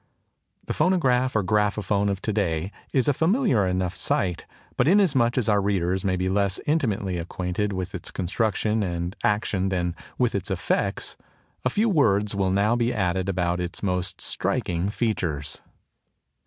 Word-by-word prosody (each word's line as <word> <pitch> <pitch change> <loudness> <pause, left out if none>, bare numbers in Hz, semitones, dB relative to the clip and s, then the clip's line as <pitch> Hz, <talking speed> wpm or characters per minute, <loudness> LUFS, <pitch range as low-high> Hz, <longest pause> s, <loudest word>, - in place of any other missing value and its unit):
The - - -2
phonograph 130 -9 +2
or 110 - +2
graphophone 105 0 +1
of 100 0 -3
to 110 - -1
day 90 -3 -1 0.2
is 130 -4 +2
a 145 - +4
familiar 160 - +2
enough 90 -1 -1
sight; 90 -3 -1 0.3
but 125 - +2
inasmuch 145 - +4
as 125 - +1
our 105 -2 +3
readers 95 -2 0
may 95 -2 +1
be 90 +1 -1
less 100 -1 +1
intimately 105 - 0
acquainted 90 +4 -2
with 95 -1 -4
its 95 - -5
construction 110 +3 0
and 85 -1 -2
action 105 -2 +1
than 90 -2 -1 0.2
with - - +1
its - - -2
effects, - - -1 0.5
a - - +2
few 220 +3 +1
words 105 - +2
will 100 -1 +1
now 100 +5 +2
be 120 0 +1
added 95 -4 0
about 90 -1 0
its 90 +2 -5
most 90 -2 -1
striking 90 +2 -1
features. 85 -10 -2
100 Hz, 155 wpm, -25 LUFS, 90-115 Hz, 0.5 s, a